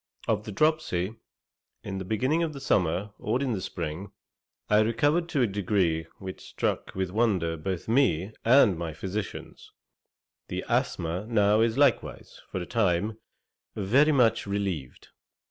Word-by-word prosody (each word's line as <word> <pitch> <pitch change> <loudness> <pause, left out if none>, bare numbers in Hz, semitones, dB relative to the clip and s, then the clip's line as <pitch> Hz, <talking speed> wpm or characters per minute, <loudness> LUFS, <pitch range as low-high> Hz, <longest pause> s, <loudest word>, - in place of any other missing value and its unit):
Of - - 0
the - - -5
dropsy, 110 - +1 0.7
in 95 -1 -4
the 95 - -5
beginning 130 - +1
of 165 -2 -1
the 140 - -7
summer, 100 -5 0
or 115 +4 0
in 135 -3 -1
the 95 - -3
spring, 90 +1 -5 0.6
I 105 - +4
recovered 145 +10 +2
to 145 -6 +1
a - - +5
degree 95 -5 0
which 95 -1 -8
struck - - -3
with 95 -1 -2
wonder 95 -7 +1
both 90 +2 -4
me 110 - +2
and 120 -5 +6
my 85 -2 -4
physicians: 95 +6 -6 0.8
the - - -4
asthma 85 +5 -1
now 105 -2 +3
is 115 0 +1
likewise, - - +1
for 95 - -2
a 90 - -4
time, 105 0 0 0.6
very 130 +10 +3
much 115 -6 +3
relieved. 95 -10 -4
105 Hz, 145 wpm, -27 LUFS, 90-115 Hz, 0.8 s, and